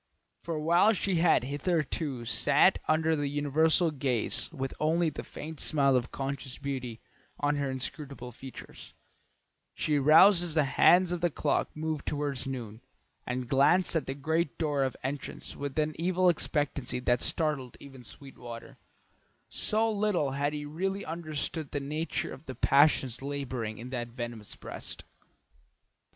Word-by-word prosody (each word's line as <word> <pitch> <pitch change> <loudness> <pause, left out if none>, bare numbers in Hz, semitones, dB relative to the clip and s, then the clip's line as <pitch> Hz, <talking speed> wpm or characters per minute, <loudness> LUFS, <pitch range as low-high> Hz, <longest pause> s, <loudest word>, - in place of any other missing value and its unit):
For 165 -2 -4
while 170 +7 +4
she 195 -2 0
had 165 -6 +4
hitherto 145 -2 -2
sat 145 +9 +3
under 160 +1 +2
the 145 -1 -1
universal 155 +4 +2
gaze 130 -3 0
with 135 -4 -4
only 160 +1 +2
the - - -6
faint 155 0 -8
smile 140 -3 +2
of 125 -1 0
conscious 135 -1 -4
beauty 130 -5 -5 0.4
on 145 0 +1
her 140 -1 -1
inscrutable 130 -1 -5
features, 130 +2 -11 0.8
she 150 -2 +1
roused 165 +6 +7
as 170 -3 -2
the 155 - +4
hands 175 +5 +5
of 175 -1 -2
the 175 - +2
clock - - 0
moved 155 -1 -3
toward 145 -3 -2
noon, 120 -4 -6 0.5
and 125 0 -3
glanced 140 +9 +3
at 160 - 0
the 135 - -3
great 160 +2 -1
door 150 -4 0
of 130 - -2
entrance 140 +2 -5
with 140 0 -5
an 155 0 +1
evil 180 +1 +3
expectancy 145 -6 -1
that 125 -1 +1
startled 150 -6 0
even 135 -3 -12
Sweetwater, 120 -2 -10 0.7
so 220 +1 +1
little 200 -9 0
had 140 +2 0
he 150 -1 -5
really 190 +6 -3
understood 155 -2 -4
the 145 - -2
nature 150 +4 -3
of 140 - -13
the 130 - -6
passions 135 -1 +3
labouring 130 -6 -4
in 125 +3 -8
that 120 -2 -3
venomous 120 -3 -7
breast. - - -7
145 Hz, 150 wpm, -29 LUFS, 130-160 Hz, 0.8 s, roused